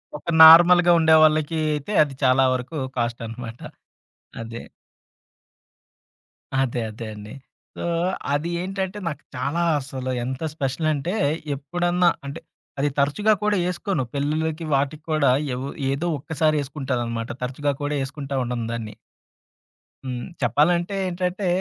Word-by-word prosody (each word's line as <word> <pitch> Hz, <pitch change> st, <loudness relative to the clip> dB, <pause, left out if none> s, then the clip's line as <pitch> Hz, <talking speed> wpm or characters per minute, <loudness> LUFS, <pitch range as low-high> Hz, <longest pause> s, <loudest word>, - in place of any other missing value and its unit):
ఒక 150 Hz, -, -7 dB
నార్మల్‌గా 175 Hz, +2 st, +9 dB
ఉండేవాళ్ళకి 155 Hz, 0 st, +4 dB, 0.2 s
అయితే 150 Hz, +8 st, -5 dB
అది 145 Hz, -2 st, -6 dB
చాలా 130 Hz, 0 st, +4 dB
వరకు 130 Hz, +5 st, -4 dB, 0.2 s
కాస్ట్ 120 Hz, 0 st, -1 dB
అనమాట. 115 Hz, +1 st, -8 dB, 0.8 s
అదే. 115 Hz, +1 st, -7 dB, 2.0 s
అదే, 125 Hz, -2 st, -1 dB
అదే 110 Hz, +2 st, -8 dB
అండి. 105 Hz, 0 st, -10 dB, 0.4 s
సో -, -, -5 dB, 0.5 s
అది 150 Hz, +4 st, -1 dB
ఏంటంటే 190 Hz, +1 st, -3 dB
నాకు 150 Hz, -3 st, -5 dB
చాలా 140 Hz, +7 st, -1 dB, 0.2 s
అసలు 130 Hz, -1 st, -5 dB
ఎంత 130 Hz, +1 st, -4 dB
స్పెషల్ 145 Hz, +1 st, -2 dB
అంటే 150 Hz, +5 st, -3 dB, 0.4 s
ఎప్పుడన్నా 175 Hz, +4 st, +1 dB, 0.2 s
అంటే, 140 Hz, +4 st, -6 dB, 0.4 s
అది 145 Hz, +1 st, +2 dB
తరచుగా 205 Hz, +10 st, +3 dB
కూడా 210 Hz, -1 st, +2 dB
ఏసుకోను. 180 Hz, -4 st, -2 dB
పెళ్ళిలకి 155 Hz, +3 st, -1 dB
వాటిక్కూడా 150 Hz, 0 st, +1 dB, 0.2 s
ఎవో 130 Hz, +2 st, -4 dB, 0.2 s
ఏదో 140 Hz, +6 st, -2 dB
ఒక్కసారి 155 Hz, +2 st, 0 dB
ఏసుకుంటాననమాట. 125 Hz, -5 st, -3 dB
తరచుగా 140 Hz, +3 st, -1 dB
కూడా 145 Hz, +1 st, -1 dB
ఏసుకుంటా 140 Hz, 0 st, -6 dB
ఉండను 120 Hz, -2 st, -3 dB
దాన్ని. 110 Hz, -2 st, -5 dB, 1.1 s
హ్మ్. 125 Hz, -2 st, -4 dB, 0.2 s
చెప్పాలంటే 170 Hz, -, +2 dB
ఏంటంటే 180 Hz, +2 st, -2 dB
145 Hz, 115 wpm, -23 LUFS, 130-165 Hz, 2.0 s, నార్మల్‌గా